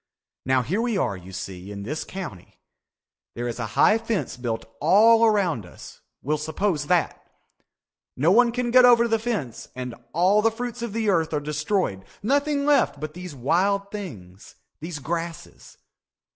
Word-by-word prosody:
Now 130 -1 +3
here 190 - -1
we 235 -3 0
are, 100 - 0
you 95 0 -11
see, 95 +1 -7
in 100 -1 -7
this 150 +9 -4
county. 170 - -9 0.8
There 120 +1 -3
is 120 0 -5
a 115 - -2
high 215 +1 +5
fence 225 -3 -2
built 115 -2 -4 0.2
all 225 +3 +6
around 195 - +2
us. 90 - -13 0.2
We'll 150 +2 0
suppose 160 0 -1
that. 175 -2 +1 1.0
No 155 +7 +3
one 235 +3 +5
can 240 0 -2
get 255 +1 +7
over 235 -1 +6
the 225 -1 +1
fence 210 - -4
and 125 -1 -5 0.2
all 185 +6 +3
the 225 - +4
fruits 240 +1 -6
of 235 -3 -4
the 220 -2 +1
earth 165 -3 0
are - - +1
destroyed, 150 - -2 0.2
nothing 285 +4 +1
left 285 - +3
but 155 0 -5
these 180 -3 -8
wild 195 +10 +1
things, 105 - -9 0.2
these 160 0 -6
grasses. 165 +2 -6
175 Hz, 165 wpm, -24 LUFS, -, 1.0 s, get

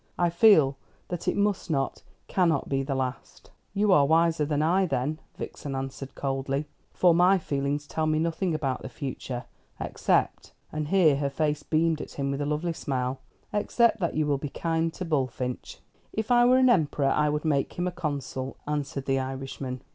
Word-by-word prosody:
I 175 -1 +2
feel 160 -8 +5 0.3
that 175 -2 -5
it - - +1
must 200 -2 0
not, 135 -4 -1 0.3
cannot 170 -6 +1
be 135 -1 0
the 135 0 -2
last." 130 -1 -5 0.2
"You 205 0 +3
are 145 -6 +5
wiser 165 -1 +3
than 150 0 +1
I, 185 +4 +3
then," 150 +2 -1 0.2
Vixen 140 -2 -6
answered 135 0 -6
coldly; 135 +1 -2 0.3
"for 180 -2 +4
my 180 +3 +5
feelings 145 -2 -2
tell 155 +1 -2
me 155 0 +2
nothing 165 +2 0
about 135 -4 -2
the - - -7
future 125 0 -5 0.3
except" - - 0 0.2
and 155 -1 -3
here 160 -5 +4
her 140 0 0
face 150 +1 -1
beamed 160 0 +1
at - - -8
him 140 -1 -2
with 140 +1 -2
a 145 - -1
lovely 155 +3 -1
smile 130 -4 -2 0.3
"except 220 +2 +2
that 170 -3 -1
you 155 0 +1
will 145 -2 +1
be 145 - -4
kind 165 +2 -1
to 185 - -4
Bullfinch." 130 -5 -2 0.3
"If 220 +2 -3
I 240 0 +6
were 250 +1 +6
an 255 -1 +5
emperor 150 -7 +2
I 150 0 +2
would 150 +2 -2
make 140 -3 +1
him 175 - -2
a 180 - -1
consul," 145 -6 -4
answered 145 -2 -3
the 135 -1 +1
Irishman. 130 -1 -5
150 Hz, 185 wpm, -27 LUFS, 135-170 Hz, 0.3 s, I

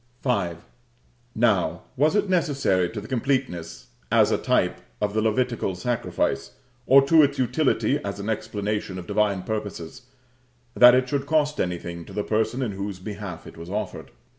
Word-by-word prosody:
V. 100 -10 0 0.8
Now, 100 -8 +1
was 150 +7 +2
it 205 -1 +2
necessary 140 - +1
to 105 - -6
the 105 - -9
completeness, 125 -10 -2 0.2
as - - +4
a - - +3
type, - - +1 0.2
of 105 -1 -1
the 110 - +1
Levitical 115 -3 0
sacrifice, 115 - -2 0.3
or 135 +1 +7
to 160 +3 +6
its 140 -1 +2
utility 135 +1 +1
as 100 0 -4
an 100 - -5
explanation 105 -2 -3
of 90 - -7
divine 100 -2 0
purposes, 105 -1 -5 0.7
that 125 0 +8
it 130 0 +2
should 140 +1 -2
cost 150 -1 +1
anything 85 -1 -4
to - - -12
the 105 - -2
person 110 +5 0
in 115 - -2
whose 100 0 -5
behalf 100 -3 -7
it - - -12
was 85 +1 -9
offered? 105 +2 -4
110 Hz, 165 wpm, -24 LUFS, 95-130 Hz, 0.8 s, that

